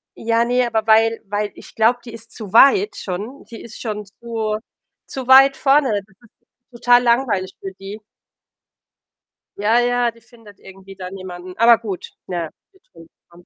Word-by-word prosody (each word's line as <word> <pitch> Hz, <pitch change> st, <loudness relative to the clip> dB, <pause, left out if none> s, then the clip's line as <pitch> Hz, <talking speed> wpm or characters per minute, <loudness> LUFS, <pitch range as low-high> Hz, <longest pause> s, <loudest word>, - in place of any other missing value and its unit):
Ja, 230 Hz, +1 st, 0 dB
ne, 245 Hz, 0 st, +1 dB
aber 220 Hz, -1 st, -1 dB
weil 225 Hz, +1 st, +3 dB
weil 205 Hz, +1 st, -3 dB
ich -, -, -13 dB
glaube, 225 Hz, +2 st, +3 dB
die 235 Hz, -, -10 dB
ist 230 Hz, 0 st, -10 dB
zu 215 Hz, -3 st, -9 dB
weit 380 Hz, -, +5 dB
schon. 210 Hz, +9 st, -6 dB
Die 230 Hz, -, -11 dB
ist 225 Hz, -, -11 dB
schon 210 Hz, -2 st, -4 dB
zu 220 Hz, 0 st, -4 dB, 0.5 s
zu 260 Hz, -2 st, -6 dB
weit 270 Hz, +1 st, +7 dB
vorne. 275 Hz, -1 st, +3 dB
Das 205 Hz, -2 st, -2 dB
ist 215 Hz, +3 st, -27 dB, 0.2 s
total 245 Hz, +1 st, +4 dB
langweilig 235 Hz, -6 st, +1 dB
für 195 Hz, -, -7 dB
die. 195 Hz, +2 st, -8 dB, 1.6 s
Ja, 220 Hz, +4 st, +2 dB
ja, 245 Hz, 0 st, +1 dB
die 230 Hz, 0 st, -22 dB
findet 225 Hz, -4 st, -18 dB
irgendwie 195 Hz, 0 st, -14 dB
da 185 Hz, -1 st, -7 dB
niemanden. 185 Hz, -1 st, -9 dB
Aber 230 Hz, 0 st, +6 dB
gut, 205 Hz, -5 st, -7 dB, 0.2 s
na 175 Hz, -2 st, -3 dB
ja, -, -, -9 dB, 0.2 s
wird 380 Hz, -, -27 dB
schon 165 Hz, -1 st, -15 dB, 0.2 s
kommen. 175 Hz, +1 st, -19 dB
225 Hz, 175 wpm, -20 LUFS, 195-240 Hz, 1.6 s, weit